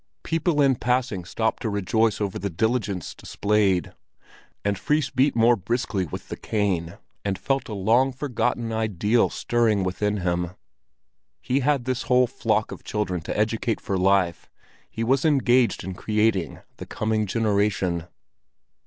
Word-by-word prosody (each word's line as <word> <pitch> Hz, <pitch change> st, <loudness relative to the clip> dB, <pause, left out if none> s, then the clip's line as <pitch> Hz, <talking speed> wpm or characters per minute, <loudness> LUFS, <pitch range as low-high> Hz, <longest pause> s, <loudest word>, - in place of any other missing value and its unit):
People 165 Hz, -2 st, +1 dB
in 135 Hz, -3 st, +3 dB
passing 125 Hz, -8 st, 0 dB
stopped 110 Hz, +4 st, -1 dB
to 115 Hz, -, -1 dB
rejoice 105 Hz, +2 st, +1 dB
over 100 Hz, -3 st, -2 dB
the 100 Hz, -, -2 dB
diligence 100 Hz, -, -1 dB
displayed, 100 Hz, -4 st, 0 dB, 0.7 s
and 100 Hz, 0 st, +1 dB
Fris 150 Hz, +3 st, 0 dB
beat 135 Hz, +2 st, +2 dB
more 120 Hz, +1 st, +5 dB
briskly 105 Hz, -3 st, -2 dB
with -, -, -7 dB
the -, -, -4 dB
cane, 95 Hz, -6 st, -1 dB, 0.3 s
and 100 Hz, -2 st, -1 dB
felt 135 Hz, +7 st, -1 dB
a 105 Hz, -, -4 dB
long 115 Hz, +7 st, +3 dB
forgotten 125 Hz, -3 st, -2 dB
ideal 110 Hz, +1 st, +1 dB
stirring 115 Hz, -4 st, +1 dB
within 105 Hz, +3 st, -1 dB
him; 90 Hz, -1 st, -2 dB, 0.8 s
he 130 Hz, +2 st, 0 dB
had 140 Hz, -2 st, +1 dB
this 130 Hz, -1 st, -1 dB
whole 125 Hz, 0 st, +5 dB
flock -, -, -1 dB
of -, -, -9 dB
children 100 Hz, -5 st, -2 dB
to -, -, -4 dB
educate 110 Hz, +1 st, 0 dB
for 100 Hz, -, -3 dB
life, 95 Hz, -2 st, +1 dB, 0.4 s
he 115 Hz, -, -4 dB
was 135 Hz, +4 st, +2 dB
engaged 130 Hz, -5 st, +3 dB
in 95 Hz, -, -5 dB
creating 105 Hz, -2 st, 0 dB, 0.2 s
the -, -, -8 dB
coming 110 Hz, -1 st, -1 dB
generation. 100 Hz, -5 st, 0 dB
110 Hz, 145 wpm, -24 LUFS, 95-125 Hz, 0.8 s, more